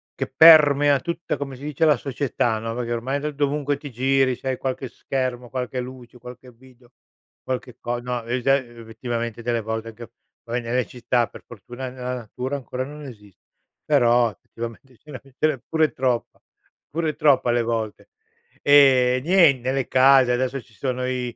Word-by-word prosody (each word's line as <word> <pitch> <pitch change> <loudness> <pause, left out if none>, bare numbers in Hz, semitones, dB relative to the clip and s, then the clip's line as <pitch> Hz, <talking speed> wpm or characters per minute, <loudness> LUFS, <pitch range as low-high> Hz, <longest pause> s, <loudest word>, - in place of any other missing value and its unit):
che - - -3
permea 145 -2 +7
tutta, 170 +2 -3
come 135 -2 -6
si 140 - -13
dice, 150 +1 -2
la 150 -3 +4
società, 120 -3 -1
no, 115 +1 -4
perché, 120 -1 -3
ormai, 130 +4 -2
d 150 +1 -3
dovunque 145 0 -1
ti 145 -1 -9
giri, 130 +1 +1
se 135 - -5
hai 130 - -1
qualche 130 0 -4
schermo, 125 -1 -4
qualche 125 0 -4
luce, 125 -1 -11
qualche 125 +1 -12
video, 125 0 -21 0.5
qualche 125 -1 -5
co 120 0 -3
no, 120 -1 -4
e 120 +2 -2
sa 135 +2 +4
uhm, 120 -4 -6
effettivamente 115 0 -5
delle 120 0 -1
volte 110 +1 -5
che 115 -1 -11 0.3
va 115 - -8
bene 120 -1 -3
lei 125 -3 0
ci 125 - -12
sta, 120 0 +1
per - - -14
fortuna, 120 +3 -8
nella 125 0 -5
natura, 125 +3 -5
ancora 130 -1 -5
non 150 +1 -10
esis 105 -7 -13 0.5
però, 120 0 +3
effettivamente, 115 +5 -10
ce 150 - -16
n'è 130 - -7
ce 135 +2 -1
n'è 150 -4 -2
pure 160 -1 +1
troppa 125 -2 -2 0.5
pure 160 0 -2
troppa 140 -4 +3
alle 120 0 +2
volte. 115 -2 -4 0.5
Ehm, 130 -3 +5
nien 165 -5 +5
nelle 130 +1 -1
case 130 -1 +5
adesso 130 +2 -1
ci 110 - -24
sono 125 +1 -3
i 125 -2 -3
125 Hz, 185 wpm, -23 LUFS, 120-135 Hz, 0.5 s, permea